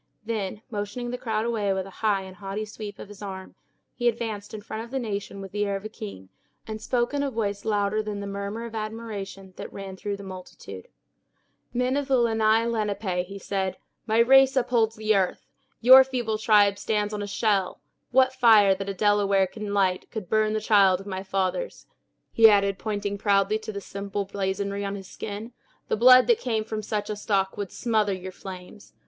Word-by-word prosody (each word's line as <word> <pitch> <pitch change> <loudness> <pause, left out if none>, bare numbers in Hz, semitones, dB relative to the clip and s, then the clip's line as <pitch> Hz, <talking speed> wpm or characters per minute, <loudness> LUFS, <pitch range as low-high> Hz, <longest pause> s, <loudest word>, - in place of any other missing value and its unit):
Then 215 -1 -3
motioning 225 +4 -4
the 250 - -3
crowd 220 -2 -1
away 215 -4 0
with 190 -1 -2
a 195 - -11
high 205 -3 +2
and 190 -1 -11
haughty 200 +2 -4
sweep 210 -1 -8
of - - -9
his 205 0 -13
arm, 190 -2 -7 0.4
he 240 - -1
advanced 220 -3 -2
in 215 - -6
front 220 +1 -5
of 235 - -11
the 270 - -3
nation 200 -4 -4
with 195 -1 -8
the 205 0 -1
air 200 -1 -1
of 195 +2 -6
a - - -4
king, 95 - -9 0.4
and 215 0 -6
spoke 240 +3 0
in 285 - 0
a 285 - 0
voice 205 -5 -3
louder 210 0 +1
than 210 -1 -5
the 200 - -5
murmur 200 +3 -4
of 230 - -8
admiration 215 -3 -6
that - - -7
ran 195 -1 -7
through 200 +1 -4
the 200 - -10
multitude. 185 - -10 0.8
"Men 250 +2 0
of 285 -1 -1
the 270 -2 +3
Lenni 225 -1 +3
Lenape!" 205 -5 -1
he 200 +1 -8
said, 195 -1 -2 0.3
"my 220 0 +1
race 270 +3 +6
upholds 235 -3 +2
the 215 0 +1
earth! 190 -2 0 0.4
Your 260 +3 +10
feeble 240 -5 -2
tribe 205 -2 +4
stands 210 -1 -1
on 210 - -3
my 205 - -4
shell! 200 -2 0 0.3
What 260 +1 +4
fire 220 -6 +6
that 195 +1 -5
a 195 - -3
Delaware 200 -1 +3
can 210 +2 -6
light 190 -2 +1
would 210 -5 -5
burn 215 0 +2
the 215 - 0
child 200 -4 +4
of 195 - -10
my 190 -2 -4
fathers," 195 - -2 0.5
he 225 -1 +7
added, 200 -2 +2
pointing 205 -2 -3
proudly 200 +1 +2
to 215 0 -6
the 200 - -5
simple 200 0 -4
blazonry 200 +1 -2
on 200 0 -3
his 195 -2 -9
skin; 215 +5 -7 0.4
"the - - +2
blood 255 +3 +7
that 470 -1 +3
came 225 - -1
from 215 0 -4
such 210 0 -3
a - - -2
stock 195 -2 0
would 200 -3 -5
smother 215 -4 0
your 185 0 -6
flames! 185 +2 -11
210 Hz, 205 wpm, -26 LUFS, 195-225 Hz, 0.8 s, Your